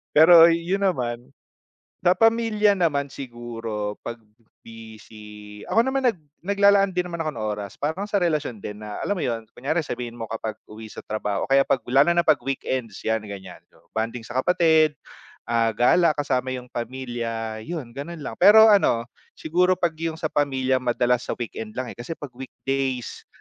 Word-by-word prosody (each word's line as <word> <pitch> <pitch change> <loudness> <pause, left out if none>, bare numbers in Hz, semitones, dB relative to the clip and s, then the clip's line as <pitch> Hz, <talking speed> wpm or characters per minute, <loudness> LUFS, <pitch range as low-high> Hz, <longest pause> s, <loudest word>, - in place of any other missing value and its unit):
Pero 165 +2 +9
'yon 170 +4 0
naman, 120 -8 -1 0.8
sa 175 - +5
pamilya 225 -2 +3
naman 145 -6 0
siguro 115 -5 -6
pag 120 0 -6 0.5
busy, 105 -2 -12
ako 230 +3 +3
naman 265 0 0
nag 195 - -19 0.2
naglalaan 200 0 +4
din 180 0 -1
naman 170 -1 -4
ako 155 - -2
ng 110 - -5
oras 100 -1 -7
parang 160 +7 -2
sa 200 - +1
relasyon 155 - -1
din 105 +1 -8
na 105 -1 -6
alam 205 - -1
mo 175 - -3
'yon 115 -3 -3
kunyari 150 +7 -1
sabihin 120 -3 -6
mo 115 - -5
kapag 110 -1 -5
uwi 110 0 -11
sa - - -9
trabaho, 105 -2 -2
o - - -43
kaya 135 0 +6
pag 135 - +1
lalo 140 +6 +4
na 170 0 +2
na - - -32
pag 145 - +5
weekends 130 -5 -3
'yan 110 -1 0
ganiyan, 95 -3 -9 0.3
bonding 115 +1 -3
sa 120 - -9
kapatid, 160 -4 +3 0.5
ah, 115 -1 +2
gala 155 +9 +4
kasama 130 -3 -1
yung 125 -1 -9
pamilya 115 -2 -4
yun 150 -7 -6
gano'n 165 +4 -7
lang. 110 - -6
Pero 220 +2 +8
ano, 120 - +3 0.3
siguro 180 +3 +1
pag 175 -2 +1
yung 165 -1 -2
sa 155 - -3
pamilya 130 -3 +1
madalas 125 0 0
sa - - -2
weekend 110 -2 -6
lang, 130 -1 -4
eh, - - -12
kasi 120 +7 -5
pag 145 -4 -8
weekdays 130 -1 -4
130 Hz, 175 wpm, -24 LUFS, 115-170 Hz, 0.8 s, Pero